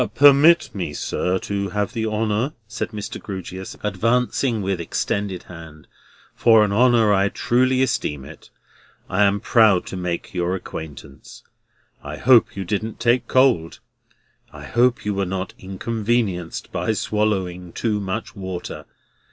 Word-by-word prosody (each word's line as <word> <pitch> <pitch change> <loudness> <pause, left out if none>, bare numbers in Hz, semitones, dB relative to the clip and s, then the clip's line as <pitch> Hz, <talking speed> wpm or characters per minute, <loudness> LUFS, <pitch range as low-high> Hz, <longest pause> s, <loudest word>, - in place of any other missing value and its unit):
Permit 145 +1 +6
me, 90 -7 -4
sir, 90 +5 -1
to 100 +1 -3
have 105 +2 -2
the 110 -1 -2
honour," 110 +5 -1
said 110 +1 -4
Mr. 105 -2 -7
Grewgious, 95 -1 -7
advancing 115 +1 0
with 95 -2 -1
extended 95 +2 -2
hand, 80 -3 -12 0.5
"for 110 -2 +5
an 105 - -3
honour 115 -2 +4
I 100 0 +2
truly 130 +4 +1
esteem 75 - -2
it. 75 +1 -13 0.6
I 95 - +1
am 100 +1 +2
proud 105 -4 +4
to - - -7
make 90 -2 -4
your 90 0 -1
acquaintance. 75 -6 -9 0.6
I - - -7
hope 125 -1 +4
you 95 - -3
didn't 110 +3 -3
take 120 +1 +2
cold. 125 -11 +2 0.7
I - - -11
hope 120 0 +1
you 105 - 0
were 100 0 -1
not 95 0 -4
inconvenienced 100 -2 -2
by - - -1
swallowing 95 -5 -1
too 105 +1 -1
much 100 +4 -4
water. 95 -3 -6
100 Hz, 140 wpm, -22 LUFS, 90-115 Hz, 0.7 s, Permit